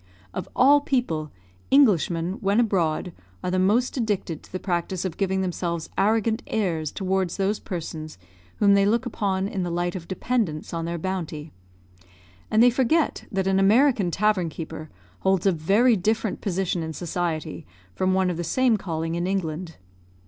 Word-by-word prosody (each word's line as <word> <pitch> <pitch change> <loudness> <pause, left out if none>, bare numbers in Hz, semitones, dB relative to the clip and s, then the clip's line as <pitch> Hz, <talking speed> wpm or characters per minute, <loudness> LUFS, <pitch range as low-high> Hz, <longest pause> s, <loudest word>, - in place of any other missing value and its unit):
Of - - -5
all 285 +3 +6
people, 165 - -1 0.4
Englishmen, 185 - +3
when 200 +2 +2
abroad, 180 -6 0 0.3
are 180 - -1
the 185 - +1
most 215 +7 +2
addicted 205 - -2
to - - -19
the 185 - -4
practice 180 0 -2
of 175 -3 -3
giving 190 -1 0
themselves 170 -2 -3
arrogant 220 +3 +2
airs 165 -8 -1
towards 190 -2 -1
those 200 +2 0
persons 160 - -6 0.4
whom 200 -1 +4
they 200 0 +4
look 235 +4 +1
upon 195 -5 -1
in 200 -2 -3
the 175 - -2
light 175 +1 -1
of 170 -2 -6
dependents 190 -7 -2
on 165 0 -2
their 170 +1 -3
bounty; 165 -4 -4 1.0
and 220 +2 +4
they 245 - +6
forget 265 +6 +1
that 195 -2 0
an 195 0 +2
American 215 0 +4
tavern 190 -2 +1
keeper 160 -1 -7 0.3
holds 190 -1 +1
a 195 - +5
very 200 +9 +3
different 215 +2 -1
position 185 -2 -1
in 160 0 -4
society 160 - -3 0.3
from 185 - +1
one 190 -1 +2
of 170 - -4
the 175 - -2
same 250 +4 +2
calling 165 -3 -3
in 170 +1 -1
England. 175 -3 -3
190 Hz, 165 wpm, -24 LUFS, 170-210 Hz, 1.0 s, all